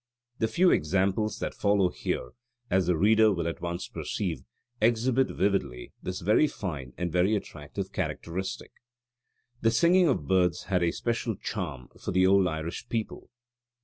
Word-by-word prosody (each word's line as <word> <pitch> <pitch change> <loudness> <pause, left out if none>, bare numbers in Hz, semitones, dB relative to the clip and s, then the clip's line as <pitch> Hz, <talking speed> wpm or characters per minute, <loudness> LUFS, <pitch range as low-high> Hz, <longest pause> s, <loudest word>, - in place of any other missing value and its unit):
The 110 - +2
few 175 +9 +3
examples 95 +6 +1
that - - -3
follow 100 -3 +2
here, 60 - -3 0.4
as 95 -1 +2
the 90 -2 +2
reader 110 +4 +5
will 85 -4 -1
at 85 - -4
once 85 +1 -3
perceive, 85 -9 -3 0.4
exhibit 120 +3 +2
vividly 90 -11 -1
this 90 +1 -4
very 105 - +4
fine 75 - -6
and 90 -1 -2
very 90 +5 +3
attractive 75 -7 -6
characteristic. 95 +3 -4 0.9
The 115 - +4
singing 170 +9 +4
of 100 - 0
birds 90 -4 +2
had 90 -1 0
a 85 - +3
special 115 +3 -2
charm 80 - -5
for - - -3
the 95 0 +3
old 95 0 +5
Irish 80 0 -4
people. 115 -2 -4
95 Hz, 150 wpm, -28 LUFS, 85-110 Hz, 0.9 s, reader